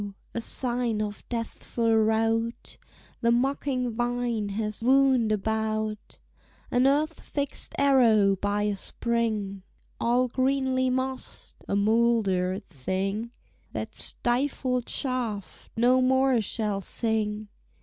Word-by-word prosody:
a 235 - -2
sign 240 -2 -1
of 210 -1 -4
deathful 230 -1 -1
rout 225 +1 +1 0.5
The 235 - +3
mocking 255 0 0
vine 240 -2 -1
has 215 +1 -3
wound 260 -3 +4
about, 215 0 -2 0.5
An 250 +2 +4
earth 305 +3 +1
fixed 285 -1 -4
arrow 230 -8 +5
by 205 +2 -1
a 210 -1 0
spring, 215 -2 -2 0.4
All 245 +2 +2
greenly 260 0 +1
mossed, 260 +1 -3
a - - 0
mouldered 200 -3 +2
thing; 190 - -3 0.4
That - - -4
stifled 250 0 0
shaft 240 -7 -3
no 250 +3 +4
more 260 -1 +3
shall 210 -1 -2
sing! 215 0 -1
230 Hz, 105 wpm, -27 LUFS, 210-255 Hz, 0.5 s, arrow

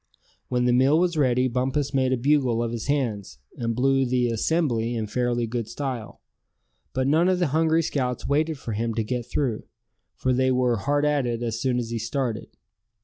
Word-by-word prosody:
When 125 -1 0
the 125 - +3
meal 135 +5 +4
was 175 0 +1
ready 130 -3 +2
Bumpus 130 +3 -1
made 130 -1 +2
a 130 - +2
bugle 130 -3 +2
of 115 - -2
his 115 -1 -5
hands, 110 - -1 0.2
and 115 -1 -2
blew 135 +2 +2
the 125 -1 +1
"assembly" 120 -2 0
in 110 -2 -2
fairly 120 +1 -1
good 115 -1 -3
style. 130 -6 -5 0.7
But 130 0 -1
none 160 +6 +3
of 185 - +2
the 175 -4 +1
hungry 160 +1 +3
scouts 125 -5 -2
waited 155 +2 +1
for 120 - -6
him 115 +1 -2
to 115 - 0
get 120 +1 -3
through; 125 -5 -2 0.5
for 130 - 0
they 130 +1 +2
were 125 -2 +2
hard 145 +7 0
at 145 -4 +1
it 120 0 -2
as 115 -1 -3
soon 130 -2 +1
as 120 -2 -3
he 115 - -2
started. 115 -1 -2
125 Hz, 200 wpm, -25 LUFS, 115-140 Hz, 0.7 s, meal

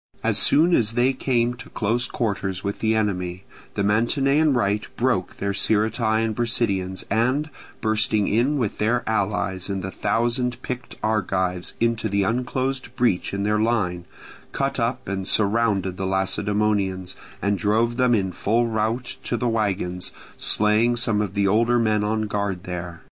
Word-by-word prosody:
As - - +2
soon 165 +4 +5
as 115 -1 +1
they 125 +3 +2
came 120 -2 0
to 125 - -11
close 120 +3 -1
quarters 100 -5 -2
with 100 0 -3
the 110 0 +1
enemy, 90 -4 -1 0.3
the 100 - 0
Mantinean 135 +8 +2
right 105 -3 +1
broke 120 -7 0
their 100 0 -2
Sciritae 110 +2 +1
and 110 -1 -2
Brasideans, 100 -6 -1
and, 130 +8 +1 0.3
bursting 110 -1 +1
in 125 +8 +2
with 115 -7 -2
their 115 +3 +1
allies 100 -3 -1
and 95 -2 -3
the 95 - -4
thousand 120 +3 0
picked 125 -1 -5
Argives 95 -4 -1
into 115 -1 0
the 100 0 +1
unclosed 125 +3 -2
breach 120 -8 +1
in 100 0 -2
their 105 +1 +1
line, 100 -6 0 0.5
cut 135 0 -1
up 125 +2 -1
and 95 -1 -3
surrounded 100 -3 +1
the 95 - -2
Lacedaemonians, 95 0 0 0.2
and 100 0 0
drove 115 +3 +1
them 125 -2 +4
in 95 -3 0
full 115 +7 +1
rout 115 +2 -1
to 120 - -1
the 120 - -1
wagons, 100 -5 -1 0.2
slaying 110 +3 +3
some 115 -3 +1
of 100 -1 -4
the 100 0 +2
older 115 +4 +3
men 110 -3 +2
on 110 +1 0
guard 100 -3 -2
there. 90 -1 -6
110 Hz, 160 wpm, -23 LUFS, 100-120 Hz, 0.5 s, soon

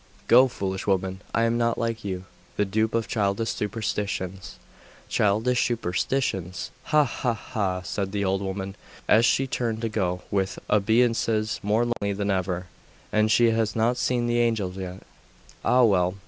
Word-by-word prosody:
'Go, 125 +2 +7
foolish 95 -5 -4
woman! 95 0 0
I 115 - +1
am 115 +1 +1
not 115 0 +1
like 115 -1 -2
you, 95 -2 -4 0.3
the 105 - +2
dupe 110 +3 0
of 115 -1 0
childish 105 +1 0
superstitions.' 100 -3 -3 0.5
'Childish 110 +4 +2
superstitions! 95 -3 -2
Ha! 150 -1 +4
ha! 120 -2 -1
ha!' 95 -6 -3
said 95 0 -3
the 100 0 -1
old 95 +1 0
woman, 95 0 -4 0.3
as 115 +2 +5
she 135 - +2
turned 115 -4 -2
to 115 - 0
go, 90 -4 -1
with 95 -1 0
obeisances 110 0 +2
more 105 +4 +2
lowly 100 -4 -1
than 100 0 -1
ever. 90 -1 -1 0.5
'And 110 0 +2
she 115 +1 +5
has 110 -2 0
not 115 +2 +2
seen 125 -1 0
the 120 0 +1
Angels 110 -6 0
yet!.... 95 -1 -7 0.6
Ah 125 0 +4
well! 90 -4 +3
105 Hz, 160 wpm, -25 LUFS, 95-115 Hz, 0.6 s, Go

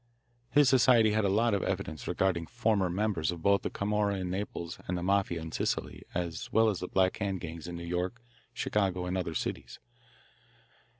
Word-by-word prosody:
His 145 -1 +5
society 120 -4 +5
had 110 0 +1
a - - +3
lot 110 +3 +2
of 100 - +1
evidence 75 -3 -3
regarding 85 -4 0
former 110 -6 +1
members 95 -4 0
of 85 -2 -8
both 100 0 +4
the - - -2
Camorra 105 0 0
in 90 -2 -3
Naples 90 -3 -4
and 90 - -1
the 85 - -4
Mafia 95 -2 +1
in 80 0 -7
Sicily, - - -2
as 85 -2 -3
well 110 0 +4
as 100 -4 -2
the 90 - -4
Black 95 0 +2
Hand 100 -3 -2
gangs 85 -1 -7
in 85 - -5
New 85 - -6
York, 90 +6 -2 0.3
Chicago, 100 -6 0
and 90 +1 -2
other 85 -3 -2
cities. - - -4
95 Hz, 190 wpm, -30 LUFS, 85-105 Hz, 0.3 s, His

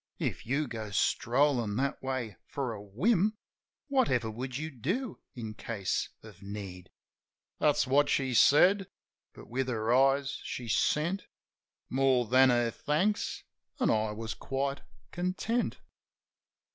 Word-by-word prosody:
If - - -3
you 145 +4 0
go 110 -3 -5
strollin' 120 +3 +2
that 135 +4 -1
way 130 -5 -3
for 135 -5 -3
a 105 - -8
whim 190 - +1 0.5
Whatever 175 - +1
would 125 +3 -5
you 155 +2 -4
do 185 - -3 0.2
in 110 -3 -5
case 105 -3 -2
of 110 -4 -14
need?" 100 -3 -7 0.7
That's 150 -2 +3
what 145 +2 +3
she 130 -3 +1
said. 185 - +5 0.5
But - - -13
with 130 +2 -2
her 115 -1 0
eyes 135 +1 +3
she 120 - -5
sent 170 - +1 0.6
More 130 -2 +2
than 130 +3 +5
her 120 -1 +2
thanks; 185 - -1 0.4
an' - - +3
I 110 0 +1
was 110 0 -5
quite 135 +1 -3 0.3
content. 185 +7 -1
130 Hz, 130 wpm, -30 LUFS, 115-150 Hz, 0.7 s, said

